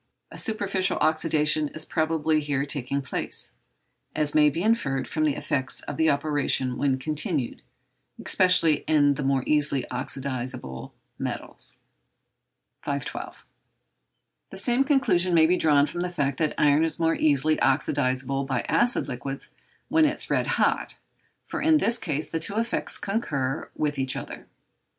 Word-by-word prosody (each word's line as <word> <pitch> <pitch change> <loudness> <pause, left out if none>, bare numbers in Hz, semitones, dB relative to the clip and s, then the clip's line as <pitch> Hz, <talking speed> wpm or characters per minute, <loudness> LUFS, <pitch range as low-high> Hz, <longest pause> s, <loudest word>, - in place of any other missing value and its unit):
A - - -10
superficial 195 -3 0
oxydation 155 -1 +1
is 155 - -3
probably 160 -1 0
here 145 -2 -1
taking 140 -1 -1
place, - - 0 0.6
as 150 -1 +1
may 150 -1 +5
be 165 +5 -3
inferred 140 - 0
from 155 -1 -1
the 150 - +1
effects 130 -1 -2
of - - -7
the 160 0 +3
operation 140 -3 0
when 135 0 0
continued, 150 - -2 0.6
especially 180 -5 +5
in 145 -2 +4
the 145 - -5
more 135 -1 +1
easily 150 -3 +1
oxydizable 125 - -4 0.3
metals. - - -6 1.0
512. - - -5 1.0
The 190 - -10
same 240 +6 +2
conclusion 265 - +2
may 160 -1 +6
be 175 +3 +3
drawn 145 -4 +4
from 175 +3 -5
the 180 - -2
fact 140 -6 -2
that 155 -2 0
iron 150 +1 +4
is 165 - +2
more 165 0 +2
easily 155 +1 +2
oxydizable 135 0 +1
by 135 - -1
acid 240 -7 +1
liquids 135 +1 -6 0.4
when 320 0 +3
it 300 0 0
is - - -4
red - - +1
hot, - - 0 0.5
for - - -5
in 315 -1 +4
this 235 -5 +2
case 150 -3 -3
the 165 - -3
two 200 +5 0
effects 230 +1 -1
concur 150 - -2
with 145 -2 -2
each 130 -1 0
other. - - -8
150 Hz, 150 wpm, -25 LUFS, 140-175 Hz, 1.0 s, may